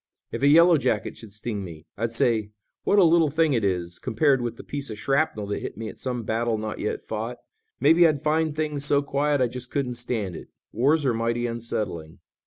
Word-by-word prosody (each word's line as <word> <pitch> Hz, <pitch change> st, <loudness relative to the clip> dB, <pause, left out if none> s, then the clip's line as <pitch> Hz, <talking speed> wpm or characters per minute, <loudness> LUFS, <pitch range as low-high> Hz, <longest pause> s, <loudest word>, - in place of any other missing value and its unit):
If -, -, -4 dB
a 140 Hz, -, +4 dB
yellow 165 Hz, +2 st, +6 dB
jacket 110 Hz, -5 st, -1 dB
should 110 Hz, -3 st, -11 dB
sting 105 Hz, -1 st, -5 dB
me, 80 Hz, -3 st, -10 dB
I'd 115 Hz, +2 st, -2 dB
say 110 Hz, -2 st, +1 dB, 0.3 s
what 205 Hz, -, +3 dB
a 200 Hz, -, +7 dB
little 165 Hz, -2 st, +5 dB
thing 155 Hz, 0 st, +2 dB
it 115 Hz, -4 st, +1 dB
is, 90 Hz, -3 st, -1 dB
compared 130 Hz, +2 st, +2 dB
with 120 Hz, -1 st, -4 dB
the -, -, -9 dB
piece 140 Hz, -2 st, -5 dB
of 110 Hz, -, -6 dB
shrapnel 135 Hz, -4 st, 0 dB
that 100 Hz, 0 st, -3 dB
hit -, -, -7 dB
me 110 Hz, 0 st, -5 dB
at -, -, -12 dB
some 125 Hz, -2 st, -3 dB
battle 115 Hz, +1 st, 0 dB
not 110 Hz, 0 st, -5 dB
yet 105 Hz, -, -3 dB
fought. 115 Hz, +3 st, -4 dB, 0.4 s
Maybe 170 Hz, +1 st, +6 dB
I'd 150 Hz, -3 st, 0 dB
find 155 Hz, +1 st, 0 dB
things 150 Hz, -2 st, -2 dB
so 145 Hz, 0 st, +2 dB
quiet 145 Hz, 0 st, 0 dB
I 125 Hz, -, +3 dB
just 125 Hz, +1 st, -7 dB
couldn't 135 Hz, -3 st, -2 dB
stand 115 Hz, -6 st, -3 dB
it. -, -, -10 dB, 0.2 s
Wars 145 Hz, +6 st, +2 dB
are 125 Hz, -, +2 dB
mighty 115 Hz, +1 st, -1 dB
unsettling." 110 Hz, -9 st, -4 dB
120 Hz, 215 wpm, -25 LUFS, 110-145 Hz, 0.4 s, a